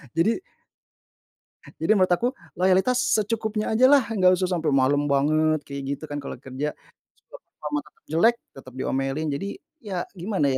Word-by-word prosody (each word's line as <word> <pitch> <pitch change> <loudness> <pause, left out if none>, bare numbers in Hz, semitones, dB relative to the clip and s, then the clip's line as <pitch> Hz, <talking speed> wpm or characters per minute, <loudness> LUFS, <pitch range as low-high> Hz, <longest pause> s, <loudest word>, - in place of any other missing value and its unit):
Jadi 215 - +2 1.4
jadi - - +4
menurut 185 -3 +3
aku, 240 +9 +2 0.2
loyalitas 190 +7 +3 0.2
secukupnya 215 0 -1
aja 240 +4 +5
lah, 285 -3 +6
nggak 185 -4 +4
usah 185 0 -1
sampai 160 -2 0
malem 140 +2 +3
banget 155 +2 +2
kayak 140 0 -6 0.2
gitu - - -16
kan 145 - -4
kalau 140 - -6
kerja. 135 +3 -4 0.5
Cuma - - -13
performa 150 -1 -4
tetap 150 - -23
jelek, 225 +9 +4 0.2
tetap 130 -2 -12
diomelin 135 +4 -1
jadi 145 +8 -3 0.3
ya 200 -4 -5 0.2
gimana 180 -4 0
ya 130 - +1
165 Hz, 160 wpm, -24 LUFS, 145-210 Hz, 1.4 s, lah